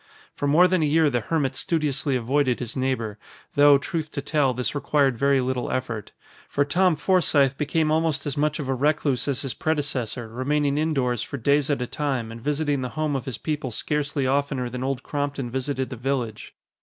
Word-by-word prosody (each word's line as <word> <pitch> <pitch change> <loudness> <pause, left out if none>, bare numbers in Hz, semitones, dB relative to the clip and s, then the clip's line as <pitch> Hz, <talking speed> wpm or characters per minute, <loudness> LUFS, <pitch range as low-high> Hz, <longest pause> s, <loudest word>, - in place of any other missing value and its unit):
For 145 - -2
more 165 +6 +6
than 185 -2 +1
a - - +3
year 155 0 +3
the 120 - +1
hermit 135 +1 -1
studiously 145 -4 0
avoided 130 +1 +1
his 120 -2 -6
neighbor, 125 -5 -2 0.3
though, 145 0 +7
truth 155 +2 -3
to 140 - -3
tell, 145 -2 +2
this 125 0 -2
required 140 -2 +2
very 140 +2 +3
little 125 0 -2
effort. 115 -5 -3 0.4
For 145 - +1
Tom 180 +3 +3
Forsythe 150 -6 +3
became 155 +2 0
almost 155 -3 +1
as 145 - -2
much 150 +1 +1
of 150 -5 -4
a 135 - +1
recluse 140 -1 +1
as 140 -1 -1
his 135 - -3
predecessor, 135 -7 -2
remaining 140 +5 0
indoors 135 -7 0
for 140 - -5
days 140 +3 +2
at 140 -4 0
a - - -2
time 130 -6 -2
and 115 0 -9
visiting 145 0 0
the 125 - -3
home 155 -2 0
of 135 - -3
his 130 -5 -4
people 150 -4 -3
scarcely 145 +3 -1
oftener 135 -2 0
than 125 +1 -4
Old 130 -1 -2
Crompton 145 -4 -3
visited 130 +1 -2
the 125 - -5
village. 120 -3 -3
140 Hz, 195 wpm, -24 LUFS, 130-150 Hz, 0.4 s, though